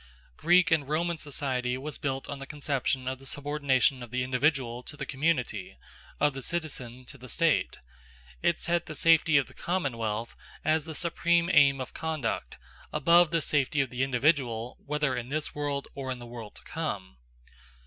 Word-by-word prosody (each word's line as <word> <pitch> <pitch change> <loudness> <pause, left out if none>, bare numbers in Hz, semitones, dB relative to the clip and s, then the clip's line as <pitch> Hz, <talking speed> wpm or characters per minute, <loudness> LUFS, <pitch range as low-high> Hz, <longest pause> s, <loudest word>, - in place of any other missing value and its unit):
Greek 180 - +4
and 145 -4 +2
Roman 170 +2 0
society 130 -4 -2
was 145 +3 -5
built 135 -1 -2
on 145 - -5
the 135 - -7
conception 140 -3 -1
of 130 0 -2
the 135 - -11
subordination 140 -3 +1
of 120 - -8
the 125 +2 -1
individual 130 -2 +1
to 150 +4 -11
the 140 - -4
community, 130 - -1 0.4
of 145 -1 +3
the 135 - -6
citizen 130 -6 -4
to 140 +1 -12
the 130 +1 -10
state; 165 +1 +2 0.6
it - - +2
set 175 0 0
the 155 - -6
safety 160 0 +5
of 140 - +3
the - - -16
commonwealth, 115 - -2 0.3
as 155 -1 +2
the 160 -2 -6
supreme 170 +1 +2
aim 140 -2 +6
of 130 - -5
conduct, 155 - -3 0.3
above 170 0 +5
the 165 -1 +1
safety 145 +1 +1
of 135 -3 +1
the 125 0 -3
individual 125 -3 +1
whether 150 -2 0
in 125 0 -4
this 155 +2 -2
world 145 -1 -2
or 135 -1 -5
in 130 - -2
the 120 - -9
world 115 -3 -9
to - - -12
come. 100 - -4
140 Hz, 180 wpm, -29 LUFS, 125-155 Hz, 0.6 s, aim